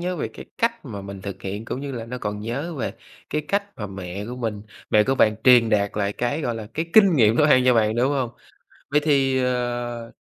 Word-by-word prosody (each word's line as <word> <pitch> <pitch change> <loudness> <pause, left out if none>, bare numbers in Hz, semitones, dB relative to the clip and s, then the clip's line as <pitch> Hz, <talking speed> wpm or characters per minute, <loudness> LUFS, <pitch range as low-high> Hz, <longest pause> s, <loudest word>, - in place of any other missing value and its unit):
nhớ 180 +1 -2
về 115 - -3
cái - - -11
cách 230 -6 0
mà 105 -6 -6
mình 100 -1 -8
thực 100 -1 -7
hiện, 100 +3 -5
cũng 125 - -4
như 140 -1 -5
là 115 -2 -5
nó 125 +2 -5
còn 105 -1 -4
nhớ 140 +10 -4
về 115 -7 -3 0.4
cái 150 - 0
cách 200 0 +1
mà 105 - -5
mẹ 95 0 -6
của 125 - -6
mình 110 -4 -3 0.3
mẹ 105 - +5
của 135 - +1
bạn 110 -4 +4
truyền 120 -3 +7
đạt 100 -2 +2
lại 100 -1 0
cái, 125 +8 -2
gọi 120 -5 -2
là, 110 -2 -6
cái 160 +2 -2
kinh 200 -7 +6
nghiệm 110 -2 +5
nấu 150 - +5
ăn 130 -4 +5
cho 125 -1 +5
bạn, 110 -1 +2
đúng 130 +4 +2
hông? 130 -4 -1 0.6
Vậy 150 - +4
thì, 135 -3 +2
ờ, 120 -2 -2
120 Hz, 245 wpm, -23 LUFS, 105-135 Hz, 0.6 s, truyền